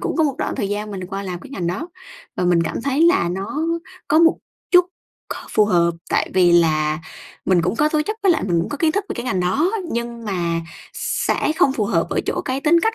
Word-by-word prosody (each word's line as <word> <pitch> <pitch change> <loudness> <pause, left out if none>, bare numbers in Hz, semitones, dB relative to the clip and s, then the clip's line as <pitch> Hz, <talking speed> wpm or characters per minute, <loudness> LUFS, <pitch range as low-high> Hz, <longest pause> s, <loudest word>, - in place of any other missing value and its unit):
cũng 375 -2 -2
có 320 - +3
một 280 - 0
đoạn - - -2
thời 195 - -1
gian 210 +1 -3
mình 185 -3 -5
qua 195 +1 -5
làm 180 -3 -5
cái - - -12
ngành 185 -11 -3
đó. 190 - -3 0.5
Và - - 0
mình 175 -1 +3
cảm 165 - -3
thấy 280 +3 +1
là 335 - +4
nó 195 - -3 0.5
có 310 - +4
một 330 0 +5 0.3
chút 360 -1 +7 0.5
k - - -10
phù 215 - +4
hợp 170 -4 +3 0.2
tại - - +1
vì 180 -2 +5
là 155 -2 +3 0.5
mình 180 -3 +3
cũng 180 +6 -1
có 300 +3 +3
tố 305 0 +1
chất 430 - -2
với 385 -3 +5
lại - - -1
mình 175 -3 +1
cũng 165 - -3
có 290 - -4
kiến 310 +1 +2
thức 410 0 -1
về - - -3
cái 240 - -5
ngành 190 -7 0
đó, 275 - +1 0.2
nhưng 235 0 -4
mà 170 -4 -1 0.3
sẽ - - 0
không 270 - +4
phù 225 -5 -1
hợp 170 -4 +1
ở - - +1
chỗ - - -1
cái 260 +1 -2
tính 330 +3 +4
cách 445 +4 +1
210 Hz, 250 wpm, -21 LUFS, -, 0.5 s, chút